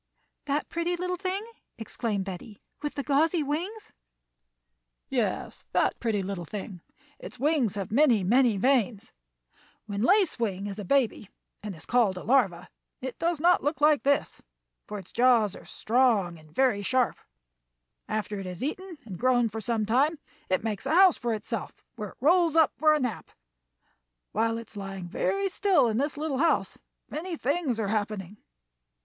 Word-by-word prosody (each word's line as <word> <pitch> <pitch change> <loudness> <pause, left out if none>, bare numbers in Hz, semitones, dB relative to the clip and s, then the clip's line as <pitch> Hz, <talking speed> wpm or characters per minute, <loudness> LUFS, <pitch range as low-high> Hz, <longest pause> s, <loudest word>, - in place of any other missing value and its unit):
"That 290 +1 -1
pretty 340 +1 -1
little 360 +1 -2
thing," 380 +3 -3 0.3
exclaimed 225 -3 -3
Betty, 195 +2 -8 0.2
"with 295 0 -4
the 280 - -3
gauzy 310 +4 +2
wings?" 360 +10 -4 1.2
"Yes, - - -2
that - - +1
pretty 215 -4 0
little 190 -2 -4
thing; 190 0 -7 0.4
its 250 - -9
wings 270 - +1
have 195 -2 -4
many, 240 -5 +4
many 235 +2 +3
veins. 240 -2 +1 0.7
When 205 -1 -4
Lace 375 - +3
Wing 200 -4 -2
is 205 0 -5
a 205 - -5
baby 245 -5 +1 0.3
and 205 -2 -6
is 155 - -11
called 225 -7 +2
a - - -6
larva, 195 -8 +1 0.3
it 260 -1 -6
does 335 -2 0
not 350 0 +4
look 295 +3 -1
like 300 -1 +4
this, 280 0 0 0.5
for 210 - -5
its 190 -3 -10
jaws 235 -5 +3
are - - -12
strong 215 -8 +1
and 155 0 -18
very 250 -1 +2
sharp. 255 +4 +1 0.9
After 215 -1 -3
it 195 - -6
has 180 +3 -6
eaten 350 +4 -4
and 190 -6 -8
grown 245 -2 +3
for 220 +1 -5
some 220 0 -1
time 275 +9 +2 0.3
it 185 +2 +1
makes 220 +3 -3
a 310 - +2
house 375 -1 +7
for 240 -1 -3
itself, 220 +1 -5 0.2
where 210 -4 -5
it - - -17
rolls 330 +3 +3
up 320 -1 +5
for 310 0 +4
a - - 0
nap. 250 -7 -3 1.0
While 225 +1 0
it 230 -1 -8
is - - -13
lying 195 -2 -6
very 395 - 0
still 385 - +3
in 225 +1 0
this 290 +2 -1
little 295 -3 -2
house 330 +2 +1 0.3
many 335 +2 -5
things 285 -4 -1
are 205 -3 -1
happening." 205 -2 -3
245 Hz, 170 wpm, -27 LUFS, 205-300 Hz, 1.2 s, house